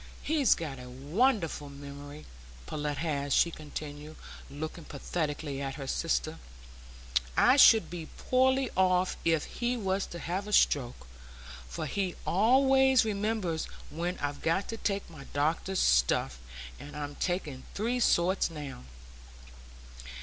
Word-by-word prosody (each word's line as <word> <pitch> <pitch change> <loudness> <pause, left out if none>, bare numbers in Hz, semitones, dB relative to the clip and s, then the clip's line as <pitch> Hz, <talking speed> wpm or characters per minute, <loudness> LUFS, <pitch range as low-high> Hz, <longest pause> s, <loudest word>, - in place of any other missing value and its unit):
He's 295 -5 +3
got 145 -5 -5
a 125 0 -9
wonderful 160 - 0
memory, 145 +1 -10 0.4
Pullet 150 - -3
has," 140 -2 -1
she 170 - +4
continued, 150 0 -8 0.3
looking 155 +4 -6
pathetically 145 -1 -3
at 135 -1 -3
her 140 - -6
sister. 160 +2 -1 1.0
"I 255 - +6
should 225 -5 +7
be 170 -3 -6
poorly 260 0 +2
off 185 -1 +3
if 165 -2 +2
he 245 +1 -2
was 195 -2 -1
to 170 - -8
have 185 +4 -3
a 210 - -4
stroke, 125 - +2 0.6
for - - -5
he 190 -3 -2
always 265 +5 +4
remembers 205 -6 -1 0.3
when 175 +3 -3
I've 145 0 -3
got 165 +5 +1
to 225 - -4
take 200 -2 -2
my 155 -5 -11
doctor's 160 +6 0
stuff; 60 0 +2 0.4
and 145 - -10
I'm 145 -1 -4
taking 155 -6 -2
three 235 +4 0
sorts 185 -5 +3
now." 150 - -7
165 Hz, 130 wpm, -30 LUFS, 145-200 Hz, 1.0 s, should